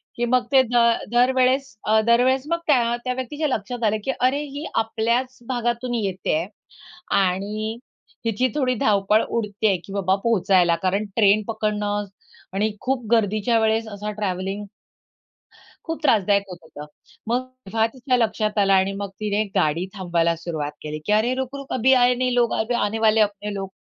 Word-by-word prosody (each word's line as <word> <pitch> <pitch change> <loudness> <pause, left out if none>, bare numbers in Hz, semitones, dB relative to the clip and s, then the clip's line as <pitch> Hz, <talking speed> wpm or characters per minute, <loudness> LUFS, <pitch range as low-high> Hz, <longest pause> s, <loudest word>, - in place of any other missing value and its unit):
की 240 - -1
मग 250 +1 +2
ते 270 -1 +7
दर 235 -1 +2
दरवेळेस 255 +1 +2
अ, 220 0 +4
दरवेळेस 255 +3 +3
मग 335 0 0
त्या 240 -5 +3
त्या 255 - 0
व्यक्तीच्या 275 +5 -3
लक्षात 245 -1 -3
आलं 215 0 +2
की 270 - 0
अरे, 260 +3 +2
ही 290 +2 -7
आपल्याच 235 +3 0
भागातून 240 0 -2
येते 195 -7 -1
आहे 170 - -3 0.7
आणि 210 +4 -2 0.5
हिची 230 +3 +1
थोडी 255 -3 +1
धावपळ 210 0 +2
उडते 215 -2 -1
आहे 195 -3 +2
की 195 - -9
बाबा 190 -1 +1
पोहोचायला. 190 -6 +3
कारण 195 +4 -1
ट्रेन 210 -1 +4
पकडणं 210 -2 -1 0.5
आणि 210 +2 0
खूप 255 -2 -1
गर्दीच्या 225 +1 +2
वेळेस 220 0 +1
असा 210 0 -5
ट्रॅव्हलिंग 195 0 -3 1.2
खूप 325 -1 -4
त्रासदायक 205 -6 +3
होत 180 - -8
होतं. 150 -2 -11 0.4
मग 245 +2 +2 0.3
तेव्हा 220 +3 +1
तिच्या 255 -1 0
लक्षात 215 -2 0
आलं 195 -1 +3
आणि 190 0 +3
मग 200 0 -4
तिने 210 0 0
गाडी 170 -1 +1
थांबायला 170 -3 0
सुरुवात 160 -3 -4
केली 155 0 -5
की 210 - +1
"अरे, 230 +4 +2
रुक-रुक 265 +1 -5
अभी 260 +2 +3
आये 250 -1 +4
नहीं, 250 0 -1 0.2
अभी 225 +2 -1
आने 225 -2 0
वाले 220 0 +3
है 215 - +6
अपने 205 0 -7
लोग." 195 -1 -4
220 Hz, 165 wpm, -22 LUFS, 200-245 Hz, 1.2 s, ते